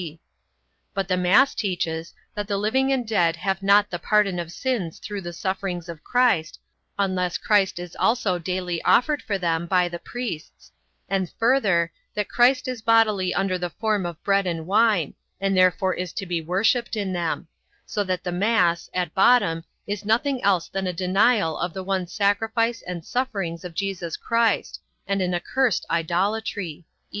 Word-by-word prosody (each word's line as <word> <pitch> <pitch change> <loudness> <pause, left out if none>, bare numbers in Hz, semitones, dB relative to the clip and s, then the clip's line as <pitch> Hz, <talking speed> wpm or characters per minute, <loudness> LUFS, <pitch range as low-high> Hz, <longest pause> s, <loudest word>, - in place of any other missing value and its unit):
(d) 165 -2 -8 0.8
But 195 -2 -1
the 185 - +1
mass 180 +9 +4
teaches, 170 -4 -3 0.2
that 205 -1 -4
the 200 -1 -1
living 265 +7 +1
and 255 -4 0
dead 175 -7 +2
have 190 +3 -2
not 205 +1 +4
the 175 - -3
pardon 200 -1 +2
of 170 -1 -5
sins 215 -8 -2
through 205 -2 -6
the 175 -1 -6
sufferings 185 -1 -3
of 165 -3 -9
Christ, 240 -11 +1 0.4
unless 185 -3 0
Christ 200 -4 +2
is 175 -1 -7
also 215 -6 +1
daily 180 -1 -3
offered 290 +3 +3
for 205 -4 -2
them 170 -2 -1
by 180 0 +3
the 170 0 -6
priests; 235 -10 -7 0.4
and 190 -3 -1
further, 205 -9 +2 0.2
that 210 -1 -2
Christ 255 +2 +3
is 250 -3 -4
bodily 215 -5 +3
under 190 -1 0
the 175 0 -2
form 210 -1 -1
of 170 -2 -9
bread 195 -1 +2
and 165 -2 -3
wine, 205 -4 +2 0.3
and 195 0 0
therefore 185 0 +3
is 180 -1 -5
to 195 - -4
be 175 -2 -2
worshipped 220 - +1
in 200 -3 -2
them; 170 -1 -2 0.4
so 205 - -1
that 185 -2 -2
the 180 - -3
mass, 180 -3 +1
at 180 -3 -1
bottom, 190 -6 +4 0.2
is 205 0 -4
nothing 245 +5 +1
else 190 -4 +2
than 190 -1 -3
a 180 - -1
denial 185 0 +2
of 175 -1 -3
the 190 - -4
one 190 -1 -1
sacrifice 225 +4 0
and 175 -2 -5
sufferings 200 -10 -2
of 175 -2 -8
Jesus 185 -4 -3
Christ, 230 -2 0 0.3
and 195 0 0
an 180 -1 0
accursed 240 +5 0
idolatry. 175 0 -1
190 Hz, 170 wpm, -24 LUFS, 175-215 Hz, 0.8 s, mass